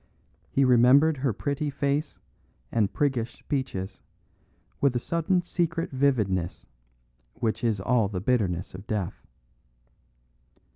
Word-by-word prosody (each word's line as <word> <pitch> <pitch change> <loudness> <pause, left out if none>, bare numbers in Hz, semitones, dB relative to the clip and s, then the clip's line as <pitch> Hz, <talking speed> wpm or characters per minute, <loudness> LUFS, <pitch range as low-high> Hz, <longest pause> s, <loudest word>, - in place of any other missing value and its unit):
He 135 - +3
remembered 130 +5 +5
her 130 -1 0
pretty 145 +7 -2
face 140 +2 -1 0.5
and 105 -3 +1
priggish 130 -6 -1
speeches 130 -9 -4 0.8
with 140 -3 +2
a - - +3
sudden 170 +6 0
secret 170 -1 -1
vividness 110 -11 0 0.7
which 110 0 -2
is 110 -4 +1
all 115 +1 +2
the 95 -2 -4
bitterness 95 -5 0
of 95 +3 -10
death. 100 -5 -3
125 Hz, 110 wpm, -27 LUFS, 105-145 Hz, 0.8 s, remembered